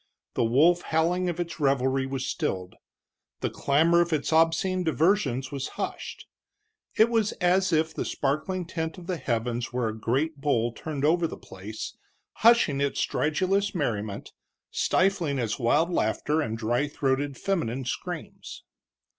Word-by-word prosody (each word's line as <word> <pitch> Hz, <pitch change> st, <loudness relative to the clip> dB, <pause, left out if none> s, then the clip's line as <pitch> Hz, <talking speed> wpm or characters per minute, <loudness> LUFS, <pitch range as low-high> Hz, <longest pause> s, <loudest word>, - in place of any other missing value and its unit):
The -, -, +1 dB
wolf 155 Hz, +10 st, +4 dB
howling 175 Hz, +3 st, +1 dB
of 175 Hz, 0 st, -4 dB
its 170 Hz, -1 st, -4 dB
revelry 135 Hz, -1 st, +1 dB
was 135 Hz, -1 st, -3 dB
stilled, 90 Hz, -1 st, -2 dB, 0.7 s
the -, -, -1 dB
clamor 165 Hz, +5 st, +3 dB
of 170 Hz, 0 st, 0 dB
its 155 Hz, 0 st, 0 dB
obscene 165 Hz, +3 st, +3 dB
diversions 160 Hz, -, +1 dB
was 140 Hz, -2 st, -3 dB
hushed. -, -, -5 dB, 0.7 s
It 220 Hz, -, +6 dB
was 225 Hz, -3 st, +1 dB
as 185 Hz, 0 st, +2 dB
if 160 Hz, 0 st, +1 dB
the -, -, -2 dB
sparkling 155 Hz, +6 st, -1 dB
tent 160 Hz, -2 st, -4 dB
of 180 Hz, -, -10 dB
the 180 Hz, -1 st, -2 dB
heavens 120 Hz, -2 st, -2 dB
were 125 Hz, -2 st, 0 dB
a 110 Hz, -, -5 dB
great 135 Hz, +8 st, -1 dB
bowl 120 Hz, -5 st, 0 dB
turned 145 Hz, +2 st, -3 dB
over 165 Hz, +2 st, +3 dB
the -, -, -8 dB
place, 100 Hz, +4 st, -8 dB, 0.4 s
hushing 225 Hz, -12 st, +4 dB
its 140 Hz, -1 st, 0 dB
stridulous 190 Hz, +6 st, 0 dB
merriment, 110 Hz, -, -2 dB, 0.4 s
stifling 180 Hz, -7 st, +1 dB
its 115 Hz, -2 st, -2 dB
wild 150 Hz, +8 st, +2 dB
laughter 150 Hz, +3 st, +1 dB
and 115 Hz, -6 st, -3 dB
dry 120 Hz, +5 st, 0 dB
throated 140 Hz, -1 st, -1 dB
feminine 135 Hz, -10 st, -1 dB
screams. -, -, -6 dB
150 Hz, 145 wpm, -27 LUFS, 125-175 Hz, 0.7 s, It